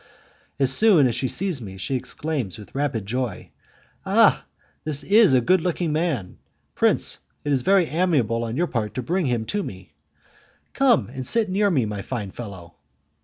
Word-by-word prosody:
As 135 -2 +3
soon 195 -6 +5
as 120 - +1
she 125 +3 -1
sees 180 -2 -1
me, 95 -3 -8
she 95 +8 -4
exclaims 130 - -3
with 105 - -13
rapid 135 -7 -2
joy, 120 -2 -4 0.5
"Ah! - - +4 0.4
this 145 -2 -1
is 205 -4 +5
a 125 - +4
good 185 +8 +3
looking 170 -2 -1
man! 150 - -2 0.3
Prince, - - +1 0.2
it 145 - -2
is 135 -2 +2
very 190 +5 +3
amiable 145 - 0
on 115 +2 -4
your 175 - +2
part 110 -9 -3
to 130 - -3
bring 175 +5 -1
him 120 -3 -1
to 205 - -2
me. 95 - -9 0.8
Come 265 -4 +3
and 130 +1 -6
sit 215 - +1
near 200 +2 +2
me, 135 - +1
my 105 -2 -4
fine 105 -4 -5
fellow!" 95 -7 -10
135 Hz, 175 wpm, -23 LUFS, 115-175 Hz, 0.8 s, soon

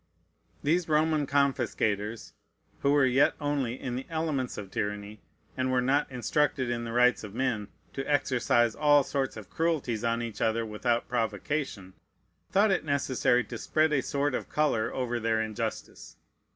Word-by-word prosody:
These 165 +3 +1
Roman 155 -1 +2
confiscators, 115 -6 0 0.5
who 140 - +2
were 145 -2 +5
yet 130 +2 +3
only 140 -4 -1
in 125 -2 -4
the 130 - -5
elements 155 -6 -2
of 100 -3 -7
tyranny, 105 0 -4 0.3
and 130 0 0
were 130 - +3
not 135 +4 +1
instructed 130 0 0
in 120 -1 -2
the 115 - -5
rights 125 0 +3
of 105 0 -8
men 120 -5 -1 0.3
to 135 - -3
exercise 120 -4 +2
all 145 -1 +4
sorts 135 -3 -2
of 105 -4 -10
cruelties 150 -9 -1
on 115 0 0
each 115 -2 -6
other 115 +1 +1
without 115 +2 -1
provocation, 115 -3 -2 0.6
thought 200 +2 +4
it 190 - +1
necessary 130 -4 +1
to 120 -2 -7
spread 155 0 +1
a 140 - +3
sort 140 +1 -1
of - - -3
color 145 -8 +1
over 120 -2 -2
their 110 0 +1
injustice. 110 -1 -5
125 Hz, 160 wpm, -28 LUFS, 115-145 Hz, 0.6 s, were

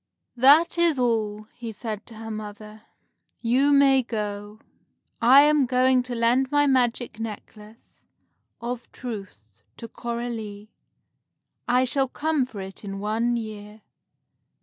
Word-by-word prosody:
"That 295 +8 +5
is 335 -4 +3
all," 220 -4 0
he 235 -2 -7
said 215 -1 -6
to 230 - -10
her 225 0 -7
mother. 215 0 -8 0.6
"You 255 +5 +2
may 275 -1 +5
go. 210 -2 -5 0.6
I 255 +4 +8
am 295 -2 +3
going 255 0 +3
to 250 0 -6
lend 240 +3 +2
my 290 0 +3
magic 245 -4 0
necklace 215 0 -10 0.6
of 240 0 -6
truth 195 - -9 0.2
to 230 - -8
Coralie. 230 -3 -6 1.0
I 250 +1 +3
shall 270 +1 0
come 300 +1 -1
for 210 -6 -8
it 190 +2 -10
in 195 -1 -6
one 225 +4 0
year." 215 -1 -8
235 Hz, 125 wpm, -24 LUFS, 215-255 Hz, 1.0 s, I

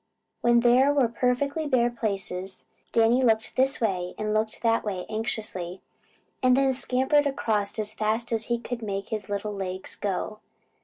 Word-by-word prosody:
When 240 0 +4
there 250 +4 +5
were 280 -4 +3
perfectly 275 +6 0
bare 240 -3 +2
places, 195 -4 -4 0.3
Danny 230 +2 +4
looked 225 -2 +2
this 265 +1 +2
way 185 -5 -1
and 215 0 -1
looked 215 +1 -1
that 230 0 +2
way 190 -4 -3
anxiously 210 -5 -3 0.6
and 255 0 +4
then 270 -1 +3
scampered 265 +3 +2
across 215 -7 -1
as 215 0 -2
fast 220 +3 -1
as 225 -1 +1
he 235 - 0
could 235 0 -6
make 200 -2 -4
his 215 -3 -4
little 205 +1 -2
legs 190 -1 -4
go. 205 +2 -3
225 Hz, 160 wpm, -26 LUFS, 205-250 Hz, 0.6 s, there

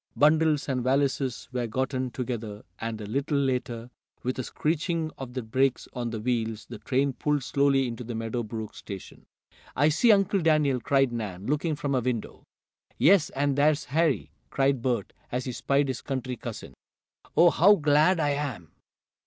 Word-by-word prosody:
Bundles 155 0 +3
and 130 -3 0
valises 135 -1 0
were 125 -2 -2
gotten 130 +2 -1
together, 115 -4 -5 0.2
and, 115 -1 -4
a 105 - -6
little 140 +7 -1
later, 125 -3 -2 0.3
with 130 +1 -2
a - - -1
screeching 160 +3 -1
of 130 -2 -7
the 130 -1 -3
brakes 130 +4 0
on 120 -2 -3
the 115 -1 -4
wheels, 115 -1 -2
the 120 -3 -9
train 135 +1 0
pulled 145 +1 0
slowly 140 0 +2
into 120 0 -5
the 120 0 -6
Meadow 115 +2 -2
Brook 110 -1 -6
station. 100 -2 -10 0.5
"I 145 +3 +4
see 225 +10 +4
Uncle 195 -1 +3
Daniel!" 155 -5 +3
cried 135 +1 +2
Nan, 105 -5 -5
looking 150 +4 0
from 145 -1 -2
a 130 - +3
window. 120 -2 -3 0.6
"Yes, 175 -2 +5
and 140 0 +1
there's 150 +1 +2
Harry!" 140 - +1 0.2
cried 135 - +1
Bert, 120 -5 -1 0.2
as 125 +1 -2
he 130 - -3
spied 140 +3 +1
his 130 -2 -3
country 130 -2 -3
cousin. 120 -4 -8 0.6
"Oh, 170 +1 +7
how 200 +8 +6
glad 155 +2 +3
I 145 -2 +2
am!" 140 - -4
130 Hz, 170 wpm, -27 LUFS, 120-145 Hz, 0.6 s, Oh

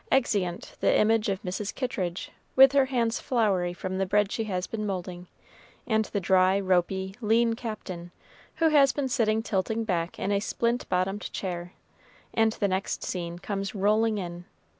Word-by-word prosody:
Exeunt 200 -9 0
the - - +3
image 220 0 +3
of 195 -1 -2
Mrs. 195 +2 -4
Kittridge, 185 -9 -3 0.2
with 265 0 +8
her 280 -1 +4
hands 235 -3 0
floury 200 -8 +1
from 185 +1 -4
the 195 - +1
bread 205 +1 +2
she 225 - -2
has 185 -3 -2
been 220 -1 -4
moulding, 180 -3 -4 0.6
and 220 -2 +1
the 205 - -2
dry, 185 +1 +3
ropy, 190 0 0
lean 230 +1 +3
Captain, 200 -7 -6 0.4
who 325 -1 +3
has 280 -3 +5
been 280 0 -2
sitting 225 -3 +1
tilting 220 +2 -1
back 175 -5 -2
in 200 - -2
a 200 - +2
splint 235 +3 -1
bottomed 190 +3 -1
chair, 175 -2 -5 0.6
and 225 -1 +3
the 205 - 0
next 190 0 -2
scene 170 -2 -4
comes 195 +2 -4
rolling 215 +2 +2
in. 175 -2 -6
200 Hz, 165 wpm, -27 LUFS, 185-225 Hz, 0.6 s, with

